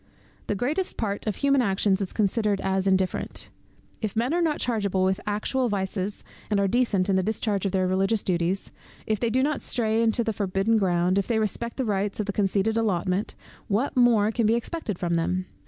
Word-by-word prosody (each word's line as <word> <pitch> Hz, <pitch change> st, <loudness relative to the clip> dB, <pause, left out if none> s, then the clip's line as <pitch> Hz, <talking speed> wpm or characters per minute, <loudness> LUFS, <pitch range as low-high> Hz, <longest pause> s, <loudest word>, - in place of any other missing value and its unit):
The 210 Hz, -, 0 dB
greatest 300 Hz, -, -1 dB
part 205 Hz, -1 st, -3 dB
of 210 Hz, -, 0 dB
human 275 Hz, -1 st, +3 dB
actions 195 Hz, -2 st, +1 dB
is 190 Hz, -, -3 dB
considered 210 Hz, -1 st, +1 dB
as 190 Hz, 0 st, 0 dB
indifferent. 190 Hz, -1 st, -1 dB, 0.5 s
If 215 Hz, -2 st, -3 dB
men 240 Hz, +6 st, +1 dB
are 350 Hz, -, +2 dB
not 315 Hz, -3 st, +1 dB
chargeable 200 Hz, -6 st, 0 dB
with 190 Hz, 0 st, +1 dB
actual 235 Hz, +5 st, 0 dB
vices, 195 Hz, 0 st, -3 dB, 0.3 s
and 205 Hz, -2 st, +2 dB
are 200 Hz, -, +2 dB
decent 205 Hz, -4 st, +2 dB
in 195 Hz, -1 st, +2 dB
the -, -, +3 dB
discharge 205 Hz, 0 st, -1 dB
of -, -, -2 dB
their 185 Hz, -1 st, +1 dB
religious 195 Hz, +3 st, +1 dB
duties; 180 Hz, +1 st, 0 dB, 0.3 s
if 215 Hz, -2 st, 0 dB
they 235 Hz, -, 0 dB
do 255 Hz, +3 st, +2 dB
not 295 Hz, 0 st, 0 dB
stray 225 Hz, -2 st, +1 dB
into 230 Hz, +1 st, +2 dB
the 225 Hz, -1 st, -1 dB
forbidden 200 Hz, +2 st, +1 dB
ground, 180 Hz, 0 st, +2 dB
if 195 Hz, -, -2 dB
they 230 Hz, -, +1 dB
respect 220 Hz, +2 st, -2 dB
the 260 Hz, -, -1 dB
rights 205 Hz, -1 st, -1 dB
of 210 Hz, -, 0 dB
the 200 Hz, -, -3 dB
conceded 205 Hz, +2 st, +1 dB
allotment, 190 Hz, -2 st, 0 dB, 0.3 s
what 225 Hz, +8 st, 0 dB
more 230 Hz, -4 st, +4 dB
can 230 Hz, -1 st, +1 dB
be 225 Hz, -, +3 dB
expected 235 Hz, -, -3 dB
from 175 Hz, -1 st, -1 dB
them? 180 Hz, +2 st, 0 dB
205 Hz, 205 wpm, -25 LUFS, 190-230 Hz, 0.5 s, more